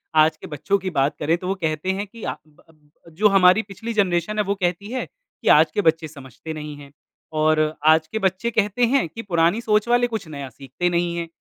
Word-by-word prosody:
आज 155 0 +4
के - - -10
बच्चों 150 +7 -1
की 190 0 -4
बात 145 -2 0
करें 160 +3 +1
तो 180 +1 -7
वो 195 - 0
कहते 155 +3 -1
हैं 200 +2 -3
कि 230 +3 -13
अ, - - -3
ब 150 - -25
ब 155 +1 -23
जो 210 +4 +4
हमारी 190 +1 +5
पिछली 215 +4 -7
जनरेशन 195 -1 0
है, - - +3
वो 200 0 -1
कहती 185 +3 -2
है 255 - -3
कि - - -15
आज - - +6
के - - 0
बच्चे 160 -2 +1
समझते 140 +1 -10
नहीं 150 -1 -7
हैं 140 -1 -13 0.5
और 155 0 +2
आज 160 0 +5
के 220 - -4
बच्चे 190 +4 -1
कहते 215 +2 +1
हैं 260 -3 +1
कि 225 - -8
पुरानी 175 +1 +1
सोच 215 -1 +1
वाले 245 0 +3
कुछ 220 -7 -5
नया 140 -3 -7
सीखते 135 +7 -3
नहीं 170 0 -1
हैं। 170 -1 -3
175 Hz, 230 wpm, -22 LUFS, 155-210 Hz, 0.5 s, आज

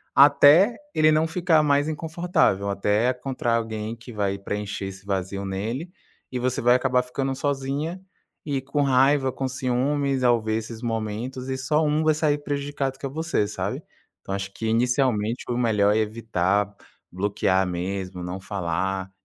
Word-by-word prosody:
até 145 - +7 0.2
ele 155 0 +5
não 155 +1 +3
ficar 165 -1 +2
mais 145 0 +2
inconfortável, 160 - 0
até 105 +4 +1
encontrar 125 -2 -2
alguém 110 0 -4
que 115 +2 -12
vai 100 -2 -1
preencher 100 0 -4
esse 95 0 -10
vazio 100 0 -2
nele 115 - -4 0.4
e 130 - -2
você 130 +1 -1
vai 120 +1 +5
acabar 125 -1 +2
ficando 135 +1 -3
sozinha 145 +6 -2 0.4
e 140 -3 -1
com 140 +2 -1
raiva, 135 0 +3
com 135 +1 -3
ciúmes 130 +2 0
ao 120 -2 +4
ver 110 0 -1
esses 110 0 -6
momentos 115 +3 -3
e 130 - -2
só 150 +4 +1
um 150 +1 +1
vai 155 0 +4
sair 150 -2 +1
prejudicado, 140 -2 -3
que - - -6
é 135 - -2
você, 160 -7 -1
sabe. 105 - -4 0.4
Então, 95 - -5
acho 100 0 -4
que 110 - -6
inicialmente 120 -1 +1
o 120 - 0
melhor 105 -4 +3
é - - +3
evitar, 105 -2 0 0.4
bloquear 95 0 +1
mesmo, 90 +1 -4
não 90 +2 -5
falar 95 0 -2
125 Hz, 160 wpm, -24 LUFS, 105-140 Hz, 0.4 s, até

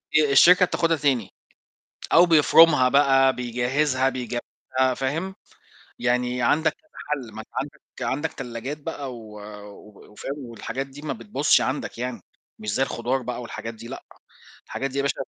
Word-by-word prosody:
آآ، 150 -2 +4
الشركة 180 +6 +7
بتاخُدها 165 -2 +1
تاني، 135 -8 +1 0.8
أو 170 +2 +8
بيفرمها 160 -4 +6
بقى 135 -1 +4
بيجهزها 130 +3 0
بيجهزها 130 +1 -2
فاهم، 160 +9 -3 0.6
يعني 125 0 0
عندك 155 +6 +3
كذا 315 - -34 0.2
حَل، 135 -6 -3
ما - - -7
أنت - - -11
عندك - - -8 0.2
عندك 150 +4 -1
تلّاجات 125 +5 -6
بقى 140 -4 -5
و 110 -3 -11 0.3
وب 105 0 -16
وفاهم 120 +6 -6
والحاجات 115 +4 -5
دي 135 +2 -13
ما 155 - -3
بتبُظش 205 -9 +2
عندك 130 -3 -3
يعني، 125 -4 -4 0.4
مش 105 -1 -4
زي 130 - +1
الخضار 130 +1 -1
بقى 125 0 -4
والحاجات 115 0 -7
دي 115 +1 -11
لأ، 135 - -8 0.6
الحاجات 135 0 -3
دي 135 - -8
يا - - +2
باشا 140 - 0
135 Hz, 155 wpm, -24 LUFS, 120-150 Hz, 0.8 s, أو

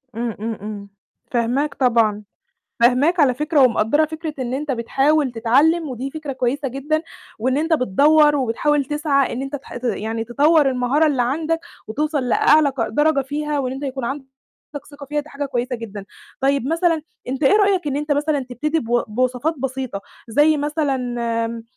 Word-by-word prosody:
امم، 230 -1 -3
امم، 225 0 -4
امم. 205 -1 -7 0.4
فاهماك 250 +5 0
طبعًا. 230 -5 +2 0.6
فاهماك 275 +9 +4
على 265 -4 +4
فكرة، 300 +2 +1
ومقدّرة 250 +3 +3
فكرة 315 0 -5
إن 255 -1 -3
أنت 290 +2 -3
بتحاول 270 +3 +1
تتعلّم، 285 +9 +2
ودي 260 +1 -5
فكرة 310 -1 -6
كويسة 265 +2 -1
جدًا، 290 +5 -2 0.4
وإن 255 +4 0
أنت 320 +3 0
بتدوّر، 295 +4 +4
وبتحاول 280 +3 +1
تسعى 295 -1 0
إن 255 - -3
أنت 275 +1 -4
تح 270 - -11
ت 245 - -8
يعني 225 0 -2
تطوّر 290 +5 +3
المهارة 255 +5 +2
اللي 275 -5 +1
عندك، 315 +6 -1 0.3
وتوصل 290 +2 -1
لأعلى 300 +4 +4
ق 260 -4 -2
درجة 295 -1 +2
فيها، 295 +2 -3
وإن 255 -2 -2
أنت 270 +2 -7
يكون 265 -2 -4
عندك 275 +3 -4 0.7
ثقة 285 0 -10
فيها، 295 +2 -1
دي 300 - -14
حاجة 285 -1 -4
كويسة 250 -2 -2
جدًا. 210 -3 -8 0.4
طيب 275 -1 +1
مثلًا 330 0 +1 0.3
أنت 265 +3 -3
إيه 275 +8 +5
رأيك، 395 -5 +2
إن 280 -1 -1
أنت 295 +1 -1
مثلًا 290 0 0
تبتدي 300 +6 -1
بو 240 -1 0
بوصفات 255 +7 0
بسيطة، 260 -5 -4 0.3
زي 295 +7 +4
مثلًا 245 -6 -2
275 Hz, 170 wpm, -20 LUFS, 240-300 Hz, 0.7 s, إيه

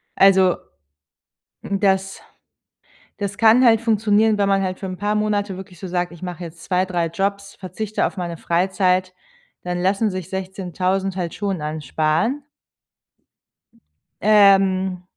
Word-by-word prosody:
Also 190 -2 +5 1.0
m 195 0 -3
das, 195 -1 0 1.0
das 200 -1 -4
kann 230 +3 +5
halt 225 -2 +5
funktionieren, 220 -1 +2
wenn 200 -1 +2
man 195 0 +2
halt 185 -1 -3
für 195 - -4
'n 185 -1 -5
paar 205 +1 -1
Monate 205 -2 -1
wirklich 190 -2 -11
so 190 - -7
sagt: 175 -1 -2
„Ich 170 - -14
mache 180 -1 -6
jetzt 165 -1 -11
2, 185 0 +1
3 175 -3 -1
Jobs, 200 +3 -3
verzichte 205 +3 -3
auf - - -6
meine 175 -2 -4
Freizeit," 185 +2 0 0.5
dann 180 0 -3
lassen 195 +4 +1
sich 185 -2 -6
16000 190 0 -3
halt 175 -3 -3
schon 195 -6 -3
ansparen. 155 - -1 1.8
Ähm 195 -3 +4
190 Hz, 140 wpm, -21 LUFS, 180-205 Hz, 1.8 s, Also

